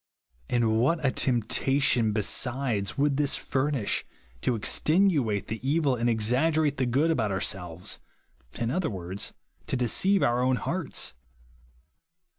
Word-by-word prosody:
And 115 -2 +2
what 155 +5 +1
a 130 - +3
temptation, 125 -1 +2
besides, 110 0 -1
would 140 0 +1
this 145 -1 +2
furnish, 135 -4 -1 0.4
to 125 - 0
extenuate 145 - +2
the 110 +1 -5
evil 140 0 +1
and 120 0 0
exaggerate 140 +7 +2
the 130 -2 0
good 140 +7 +2
about 110 -9 0
our 95 - -1
selves, 90 0 -3 0.3
— - - -36
in 115 0 -1
other 180 +2 -1
words, 95 -1 -4 0.3
to - - -1
deceive 185 - +2
our 120 +1 +2
o^vn 130 0 +2
hearts. 165 - -3
125 Hz, 135 wpm, -27 LUFS, 110-145 Hz, 0.4 s, a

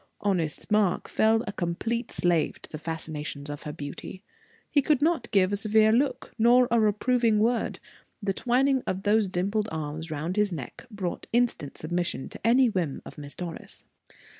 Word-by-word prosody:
Honest 180 -4 -1
Mark 210 -4 +2
fell 225 +1 +3
a - - -3
complete 220 +8 -2
slave 170 -3 +1
to - - -12
the 155 - -6
fascinations 150 -3 -5
of 145 - -7
her 150 - -5
beauty: 150 +5 -8 0.4
he 285 - +3
could 295 -1 +2
not 310 -5 +1
give 195 -1 +3
a - - +3
severe 215 +1 +4
look, 260 +5 0
nor 245 +2 +6
a 235 - +4
reproving 225 +1 +2
word: 230 +3 +1 0.4
the 200 -3 -1
twining 265 +4 +2
of 190 +1 -2
those 210 0 +3
dimpled 200 +4 -1
arms 160 +1 -4
around 160 +5 -3
his 210 -1 +3
neck 155 - -7
brought 195 -5 -4
instant 235 - 0
submission 175 -3 -2
to - - -8
any 250 +3 +5
whim 180 - -2
of - - -10
Miss 145 -1 -7
Doris. 175 -2 -6
205 Hz, 170 wpm, -27 LUFS, 165-230 Hz, 0.4 s, nor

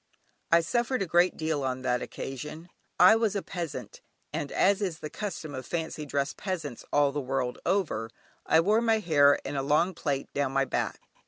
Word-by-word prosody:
I 170 0 +6
suffered 240 +5 0
a - - -2
great 175 +1 +3
deal 155 -2 -1
on 130 -1 -2
that 125 -1 +1
occasion. 150 +6 -7 0.3
I 220 - +8
was 225 -2 +1
a 200 - -1
peasant, 140 - -6 0.3
and 145 - -3
as 200 +1 +3
is 180 -5 -2
the 150 - -7
custom 170 -7 -5
of 130 -1 -5
fancy 160 -2 -4
dress 140 0 -1
peasants 165 - -5
all 145 -1 +3
the 145 +1 -2
world 130 -1 -2
over, 170 - 0 0.3
I 160 - +4
wore 210 +6 +3
my 225 -1 +3
hair 145 -8 +5
in - - -4
a 135 - 0
long 150 +7 +2
plait 140 -5 -3
down 140 -2 0
my 135 0 +2
back. - - -2
155 Hz, 190 wpm, -28 LUFS, 140-185 Hz, 0.3 s, I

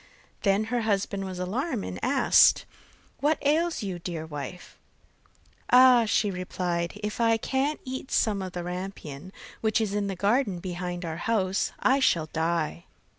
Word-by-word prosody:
Then 200 0 +2
her 240 - +1
husband 200 -2 -1
was 185 -1 -6
alarmed, 225 - -2
and - - -6
asked: 265 +3 +5 0.5
'What 300 +2 +2
ails 320 -1 +1
you, 185 -3 -4
dear 170 -2 -5
wife?' 160 +3 -8 0.9
'Ah,' 250 -2 +7
she 210 -1 +1
replied, 180 0 -3
'if 210 +2 -3
I 230 -1 +4
can't 270 +6 -1
eat 260 0 -6
some 210 -4 +1
of 185 -1 -6
the 175 - -4
rampion, 180 -3 -6 0.3
which 220 0 +2
is 215 -3 -1
in 205 -1 -1
the 195 - -3
garden 200 +1 +1
behind 175 0 -5
our 160 -1 -4
house, 195 -3 0
I 265 +2 +3
shall 170 - +2
die. 165 +1 -1
195 Hz, 155 wpm, -27 LUFS, 180-235 Hz, 0.9 s, Ah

